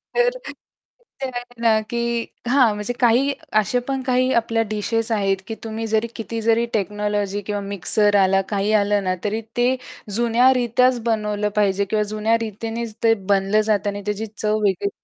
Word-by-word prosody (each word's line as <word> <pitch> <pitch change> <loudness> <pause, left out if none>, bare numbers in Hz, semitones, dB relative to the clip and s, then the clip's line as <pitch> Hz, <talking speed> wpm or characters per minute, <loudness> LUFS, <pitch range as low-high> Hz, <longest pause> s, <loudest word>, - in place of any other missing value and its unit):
तर - - +2 1.0
आहे 245 -1 -7
ना 225 -2 +4
की 235 - -2 0.5
हां. 245 -4 +4
म्हणजे 210 +3 -3
काही 255 +3 +3 0.3
असे 215 +4 0
पण 270 -1 -1
काही 255 0 +2
आपल्या 230 -1 +1
डिशेस 225 +2 -1
आहेत 195 -3 +1
की 225 - -4
तुम्ही 225 0 -4
जरी 220 +1 +1
किती 225 0 -5
जरी 230 +1 +2
टेक्नॉलॉजी 205 -1 -1
किंवा 205 -1 -2
मिक्सर 200 +2 +1
आला 195 +1 +3
काही 205 0 0
आलं 205 0 +1
ना 185 0 0
तरी 215 +2 -1 0.2
ते 245 +2 +3 0.4
जुन्या 240 +2 +4
रीत्याच 250 +1 +2
बनवलं 210 -2 0
पाहिजे 200 -1 +2
किंवा 210 +2 0
जुन्या 215 +2 0
रीतीनेच 225 +1 -5
ते 225 -1 +5 0.2
बनलं 195 +2 +2
जातं 210 -1 0
आणि 205 0 -5
त्याची 210 +1 -2
चव 215 0 +1
वेगळी 200 +1 +1
220 Hz, 165 wpm, -21 LUFS, 205-235 Hz, 1.0 s, ते